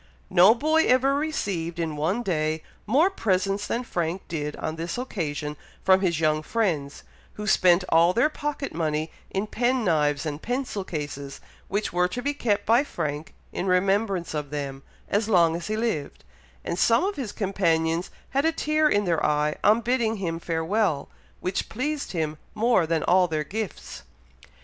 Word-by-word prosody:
No 185 +5 +7
boy 315 +5 +2
ever 260 +2 +4
received, 200 - -2
in 165 -2 -2
one 175 +11 0
day, 155 -4 -1 0.2
more 300 - +4
presents 195 - 0
than 240 - -1
Frank 175 -4 -3
did 150 -3 -3
on 155 - -4
this 165 +4 -4
occasion 150 - -3 0.3
from 190 0 +5
his 170 -5 +1
young 155 -1 +2
friends, 155 -8 -1 0.3
who 210 - -6
spent 180 -3 +4
all 165 +2 +5
their 235 +9 +3
pocket 295 -2 -4
money 155 -1 -1 0.2
in 195 +2 -1
pen 245 +2 0
knives 150 -4 +1
and 150 0 -4
pencil 245 -5 -2
cases, 145 -5 -6 0.3
which 205 -1 -2
were 180 0 +3
to 245 +7 -5
be 285 +1 0
kept 210 -7 0
by 235 +5 +4
Frank, 155 - -4 0.2
in 185 - -2
remembrance 195 -1 +1
of 150 -2 -3
them, 140 -2 -4 0.3
as 205 +2 0
long 170 -5 +4
as 170 - -5
he 215 0 -1
lived; 220 -11 -2 0.4
and 175 - -2
some 230 +1 +4
of 400 +2 -1
his 245 -7 -4
companions 170 -4 0 0.2
had 275 +2 +1
a 325 - +3
tear 305 -1 +2
in 205 -4 +2
their 170 -3 +1
eye 150 0 +1
on 215 +3 +5
bidding 235 -1 +1
him 170 -5 -3
farewell, 165 -1 0 0.3
which 185 +1 -2
pleased 285 +5 -3
him 155 -3 -2 0.2
more 220 -6 +3
than 160 -1 0
all 180 0 +4
their 155 -2 -1
gifts. 210 +5 -6
185 Hz, 170 wpm, -25 LUFS, 160-230 Hz, 0.4 s, No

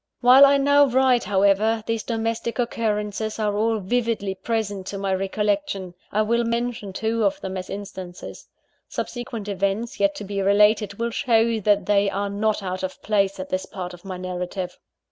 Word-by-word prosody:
While 260 +3 +8
I 280 0 +4
now 285 +1 +5
write, 255 -1 +3
however, 205 +3 +2
these 225 -1 -1
domestic 230 0 -2
occurrences 215 -3 -2
are 210 -2 0
all 220 +2 +1
vividly 220 -1 -1
present 205 -1 -3
to 200 - -4
my 195 -1 -1
recollection. 195 -1 -1 0.2
I 215 - +2
will 235 +2 +1
mention 235 -3 -2
two 225 +3 -1
of 200 - +1
them 190 0 -5
as 185 -1 -5
instances. 190 -3 -8 0.4
Subsequent 240 -4 -5
events, 200 +3 -2
yet 300 0 +2
to 285 - -6
be 200 0 -3
related, 205 +1 +3
will 235 +2 -2
show 230 -2 +2
that 205 -2 +2
they 200 0 +3
are 200 +1 -2
not 210 0 0
out 185 0 -3
of 185 0 -5
place 200 -2 +1
at 185 - -6
this 185 0 -2
part 180 -2 -6
of 175 - -13
my 190 -2 -6
narrative. 180 0 -4
210 Hz, 175 wpm, -23 LUFS, 195-230 Hz, 0.4 s, While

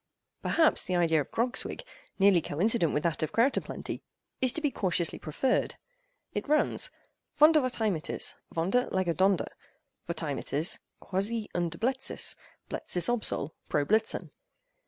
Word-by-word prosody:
Perhaps 320 -2 +3
the 180 - -1
idea 165 -3 +3
of - - -7
Grogswigg—nearly 245 - 0
coincident 175 +3 +1
with 150 - -1
that 170 -1 0
of 155 -1 -1
Kroutaplenttey—is 255 - -1
to - - -2
be 295 -3 0
cautiously 175 -7 0
preferred.—It - - -3
runs:—"Vondervotteimittis—Vonder, 250 - +1
lege 185 -3 0
Donder—Votteimittis, 185 -4 -2 0.2
quasi 210 +3 -2
und 170 -1 -2
Bleitziz—Bleitziz 255 -7 -1
obsol:—pro 160 -10 -1
Blitzen." 220 +4 +1
200 Hz, 90 wpm, -29 LUFS, 170-260 Hz, 0.2 s, Perhaps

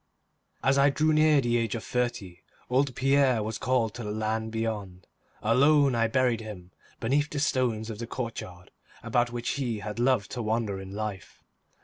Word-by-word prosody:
As 135 +1 +3
I 140 +1 +6
drew 155 +3 +2
near 155 -1 +5
the 120 -1 +1
age 115 -2 -1
of 115 - -5
thirty, 115 -8 -2 0.3
old 130 0 +2
Pierre 135 -4 +3
was 110 +1 -4
called 125 -4 +1
to 120 - -7
the 105 - -4
land 110 +1 -2
beyond. 105 -5 -4 0.4
Alone 140 +4 +4
I 115 -1 +2
buried 125 -1 +1
him 95 -5 -9 0.3
beneath 145 +6 +1
the 150 - -5
stones 120 -6 0
of 105 - -8
the 115 - -5
courtyard 110 -8 -6 0.3
about 120 +1 +1
which 120 0 -3
he 120 -4 -1
had 105 +2 -6
loved 120 -4 +2
to 125 - -3
wander 110 -3 -1
in 95 0 -8
life. 105 -3 -6
115 Hz, 175 wpm, -27 LUFS, 110-130 Hz, 0.4 s, I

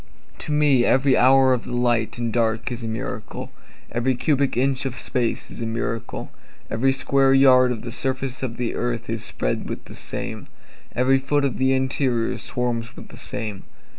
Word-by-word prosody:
To - - -5
me 145 -4 +4
every 130 +2 +3
hour 130 0 +5
of 125 - -1
the 120 - -5
light 120 -1 +1
and 120 -2 -2
dark 115 0 0
is 120 -1 -5
a - - -3
miracle, 115 0 -5 0.4
Every 125 +2 0
cubic 140 0 +1
inch 135 +1 +1
of 125 - -5
space 120 -2 -1
is - - -6
a 115 - -2
miracle, 115 0 -4 0.4
Every 125 +4 +2
square 135 0 +3
yard 130 -2 +6
of 115 -3 -4
the 120 - -5
surface 130 0 -1
of 120 -3 -4
the 120 -2 -2
earth 115 -2 -3
is 115 -1 0
spread - - -2
with - - -6
the - - -11
same, - - -2 0.5
Every 130 +2 +3
foot 140 +1 +1
of 135 - -2
the 130 0 +2
interior 130 -3 0
swarms 120 -2 -3
with - - -11
the - - -12
same. 105 -3 -2
125 Hz, 185 wpm, -23 LUFS, 115-135 Hz, 0.5 s, yard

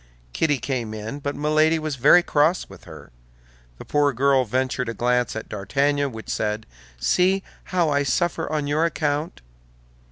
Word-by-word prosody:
Kitty 150 -3 +1
came 125 -4 -3
in, 110 +6 -6
but 140 0 -4
Milady 155 +2 +2
was 155 -2 -3
very 150 +7 +6
cross 155 +4 +1
with - - -15
her. - - -12 0.7
The - - -10
poor 145 -1 +2
girl 135 +1 +3
ventured 125 +1 -1
a 115 - -5
glance 125 0 0
at 110 - -5
D'Artagnan 140 +7 0
which 110 -1 -9
said, 105 0 -2 0.3
"See 190 - +2 0.2
how 175 -4 +1
I 145 0 +2
suffer 165 +4 -1
on 150 -2 -1
your 150 +3 +1
account!" 155 - -2
145 Hz, 160 wpm, -23 LUFS, 125-155 Hz, 0.7 s, very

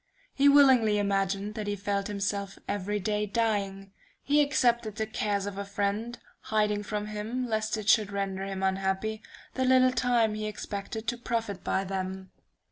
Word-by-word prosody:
He 280 +1 +5
willingly 260 -7 +6
imagined 200 0 0
that 210 -1 -5
he 205 - -1
felt 200 0 -2
himself 200 -1 -3
every 205 +1 -2
day 210 +1 -1
dying; 200 -3 -1 0.3
he 295 +1 +4
accepted 240 -6 +2
the 220 - -1
cares 205 -2 -1
of 200 -1 -5
a - - -2
friend, 205 +4 -2 0.2
hiding 210 -1 0
from 210 0 -3
him, 215 +4 -3
lest 220 -1 -1
it 215 -1 -6
should 215 -2 +4
render 195 -1 -2
him 195 -1 -4
unhappy, 190 +3 -1 0.3
the 260 - -1
little 255 0 +5
time 235 -3 +2
he 215 0 -3
expected 215 +1 -5
to 240 0 -1
profit 230 -5 -3
by 190 - 0
them. 190 0 -4
210 Hz, 165 wpm, -28 LUFS, 200-225 Hz, 0.3 s, willingly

